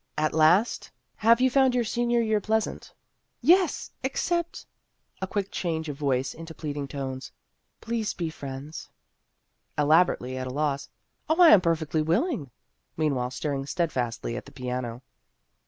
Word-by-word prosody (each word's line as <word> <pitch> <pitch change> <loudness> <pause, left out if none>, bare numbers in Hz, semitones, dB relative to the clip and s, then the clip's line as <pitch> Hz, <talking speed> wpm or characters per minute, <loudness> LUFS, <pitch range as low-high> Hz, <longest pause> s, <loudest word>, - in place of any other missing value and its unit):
At 155 0 +1
last, 160 +8 +3
" - - -48
Have 230 +2 +6
you 260 0 +4
found 265 -1 +4
your 245 - +2
senior 240 +1 +1
year 220 -2 +1
pleasant? 220 +1 -2
" - - -49
" - - -49
Yes, 365 -4 0
except 340 +6 -2 0.3
" - - -39
a 190 - -1
quick 200 0 -2
change 160 -3 -2
of 145 - -4
voice 135 -2 0
into 165 0 -10
pleading 145 -2 -4
tones 135 -2 -5 0.3
" - - -49
please 230 -2 -2
be 170 -2 -3
friends." 140 +1 -8 0.9
Elaborately 150 -4 +3
at 130 - -4
a - - -4
loss, 140 +1 -1 0.2
" - - -42
Oh, 320 +2 +2
I 345 -2 +9
am 200 - +8
per 170 -2 +3
fectly 155 -1 -1
willing! 170 - 0 0.2
" - - -48
meanwhile 140 -6 0
staring 135 +1 -3
stead 170 +2 0
fastly 120 -2 -3
at - - -6
the - - -12
piano. 125 -2 -4
160 Hz, 175 wpm, -27 LUFS, 135-220 Hz, 0.9 s, I